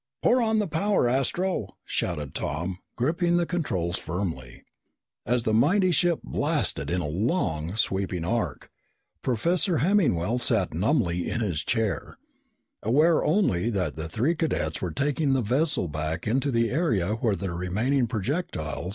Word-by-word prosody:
"Pour 250 +1 +4
on 220 -1 +2
the 210 - +2
power, 170 -1 +1
Astro!" 135 - 0
shouted 75 -5 -2
Tom, 85 +6 -3 0.2
gripping 170 +7 +1
the 175 - +2
controls 95 - -2
firmly. 80 -8 -5 0.6
As 120 +1 +1
the 110 - 0
mighty 180 - +4
ship 170 +1 +2
blasted 70 +1 -1
in 90 +1 0
a 75 - -3
long, 85 - -1
sweeping 95 -5 -1
arc, 115 +5 -2 0.5
Professor 170 - +1
Hemmingwell 135 - +2
sat 115 -8 +1
numbly 90 - +1
in 120 - -1
his 90 -8 -1
chair, 110 -3 -2 0.6
aware 155 +9 +3
only 135 - +2
that 95 -6 -1
the 80 0 -5
three 120 - +1
cadets 150 - -1
were 90 - -1
taking 140 - 0
the 130 -2 +1
vessel 135 - +2
back 80 +2 -3
into 130 +6 +1
the 115 -2 +1
area 120 - +1
where 110 -2 0
the 95 -2 -4
remaining 110 +10 0
projectile 105 - -3
115 Hz, 145 wpm, -26 LUFS, -, 0.6 s, Pour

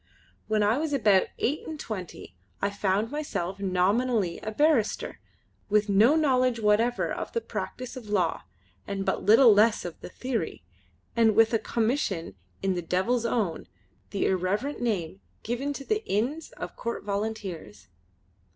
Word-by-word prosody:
When 215 -1 +2
I 215 +6 +2
was 310 -1 -2
about 210 -8 +4
eight 290 +6 -1
and 315 -1 -6
twenty 185 - -7 0.2
I 200 - 0
found 200 +2 0
myself 200 - -3
nominally 195 +1 +1
a 215 - -5
barrister, 290 -3 +1 0.5
with 210 0 +2
no 215 +9 +5
knowledge 255 -6 +2
whatever 225 +3 +2
of - - -5
the 465 - +1
practice 255 - -6
of 235 -5 -9
law 185 -5 +1 0.5
and 195 -1 -3
but - - 0
little 225 +3 +7
less 210 0 +3
of 175 - -7
the - - -8
theory, 230 - -3 0.5
and 225 -2 +4
with 225 +1 +5
a 225 - +3
commission 220 - -1 0.3
in 195 -1 +2
the 175 - -2
Devil's 220 +8 0
Own 210 -9 -1 0.4
the 200 - -1
irreverent 200 +10 -1
name 195 -5 -2 0.2
given 245 +5 -2
to 275 -1 -7
the 430 +1 0
Inns 255 +11 -1
of - - -7
Court 235 - -4
Volunteers. 200 - -4
215 Hz, 150 wpm, -27 LUFS, 195-250 Hz, 0.5 s, little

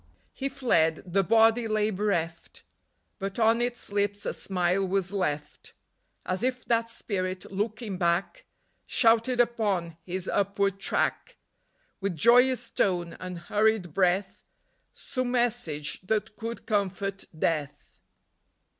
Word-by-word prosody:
He 275 0 -2
fled: 170 - +1
the 185 +2 +2
Body 225 +3 +4
lay 215 0 +1
bereft, 180 -5 -2 0.6
But 195 0 -4
on 230 +1 +3
its 240 -3 -2
lips 205 0 0
a - - -1
smile 185 0 0
was 190 0 -1
left, 150 -6 -3 0.5
As 185 +2 -2
if 250 0 -1
that 230 -1 +1
Spirit, 185 -5 -4
looking 210 0 -3
back, 180 - 0 0.4
Shouted 235 +1 +3
upon 205 -9 +1
his 185 +1 -3
upward 200 0 0
track, - - -1 0.6
With 195 -3 -2
joyous 245 - +4
tone 175 -3 0
and 180 -1 -6
hurried 205 -1 +1
breath, 190 +1 +1 0.5
Some 255 -2 -3
message 235 - -1
that 210 +2 -2
could 230 +2 -6
comfort 195 -2 -1
Death. 150 -3 -2
200 Hz, 120 wpm, -27 LUFS, 180-230 Hz, 0.6 s, Body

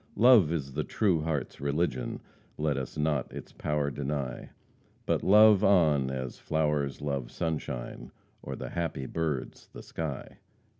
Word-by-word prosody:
Love 110 -8 +6
is 70 -5 -3
the 75 +2 -1
true 95 -5 +1
heart's 75 -3 -3
religion! 70 -3 -1 0.4
Let 75 -1 0
us 65 -2 -5
not 75 -2 0
its - - -9
power 75 -1 -1
deny. 70 -1 -4 0.6
But - - +1
love 105 0 +6
on 80 -9 +4
as 65 -2 -5
flowers 75 -3 -1
love 70 -4 -2
sunshine, 65 -7 -4 0.3
Or - - -6
the - - -6
happy 85 -6 -3
birds 75 -3 -3
the - - -9
sky." 80 -5 -6
75 Hz, 140 wpm, -29 LUFS, 70-80 Hz, 0.6 s, Love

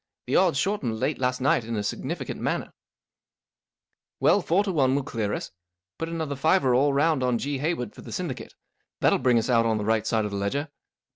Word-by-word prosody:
Tiie - - 0
odds 175 -7 +4
shortened 135 - -1
late 150 - -1
last 125 0 0
night 130 -2 +3
in 115 +1 -4
a 105 - -1
significant 105 - -4
manner/' - - -2 0.8
" - - -61
Well, - - +4
four 185 +5 +2
to 200 - -2
one 135 -6 +2
will 140 - 0
clear 110 -6 -2
us. - - -4 0.5
Put 165 - -3
another 160 -4 -3
fiver 140 -2 +3
all 140 +4 +4
round 145 +1 +2
on 125 -1 +1
G. 140 +2 -3
Hayward 145 -7 -2
for - - -12
the - - -10
syndicate. - - -5 0.5
That - - +5
11 - - +1
bring 125 -2 +4
us 115 - +1
out 115 -2 +3
on 110 -1 +1
the 105 - -3
right 110 0 +1
side 110 -2 +1
of 105 - -4
the 100 - -3
ledger." 140 +10 -2
130 Hz, 220 wpm, -26 LUFS, 115-150 Hz, 0.8 s, That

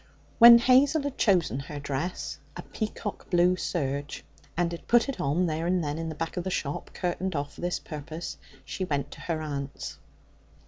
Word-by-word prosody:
When 235 0 +11
Hazel 265 +5 +4
had 285 -2 -4
chosen 180 - +3
her 145 +2 -7
dress 145 +5 -4 0.2
a - - -6
peacock 210 -2 -5
blue 180 0 +4
serge 145 -5 -3 0.3
and 175 -1 +1
had 170 - -8
put 240 +1 +4
it 275 - -4
on 155 +7 +1
there 165 0 -1
and 180 -1 +1
then 145 +1 -3
in 165 0 -3
the 160 - -6
back 165 +4 -4
of 175 - -1
the 190 - -2
shop, 145 -5 -3
curtained 180 0 -2
off 145 0 -3
for - - -12
this 175 0 -1
purpose, 155 +2 -7 0.3
she 190 - -4
went 145 -6 -2
to - - -10
her 165 -2 -2
aunt's. 140 -2 -5
170 Hz, 190 wpm, -27 LUFS, 145-190 Hz, 0.3 s, When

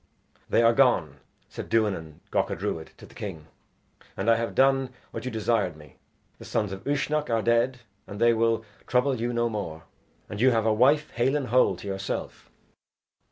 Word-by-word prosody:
"They 115 - +3
are 115 0 +5
gone," 115 - +3 0.3
said - - -8
Duanan 95 -9 -1
Gacha - - 0
Druid 80 -1 -4
to - - -13
the - - -17
king, 85 -7 -7 0.7
"and 105 +4 +2
I - - +5
have 115 0 -3
done 135 -1 +3 0.2
what 115 +1 -6
you - - -1
desired 110 -7 0
me. 75 -1 -16 0.4
The - - -11
sons 105 -3 -1
of 95 0 -7
Uisnech 145 +1 0
are 115 -2 +1
dead 120 +2 +2 0.3
and 100 - -8
they 120 0 +5
will 115 0 +1 0.2
trouble 125 -1 +1
you 120 +1 0
no 120 0 +1
more; 90 -8 -5 0.4
and 105 - -6
you 130 - +6
have 115 -3 +2
your 110 -1 +2
wife 145 +6 +3
hale 125 +4 +1
and 140 -5 -2
whole 125 -5 +4
to 95 - -10
yourself." 95 0 -5
115 Hz, 185 wpm, -26 LUFS, 100-125 Hz, 0.7 s, you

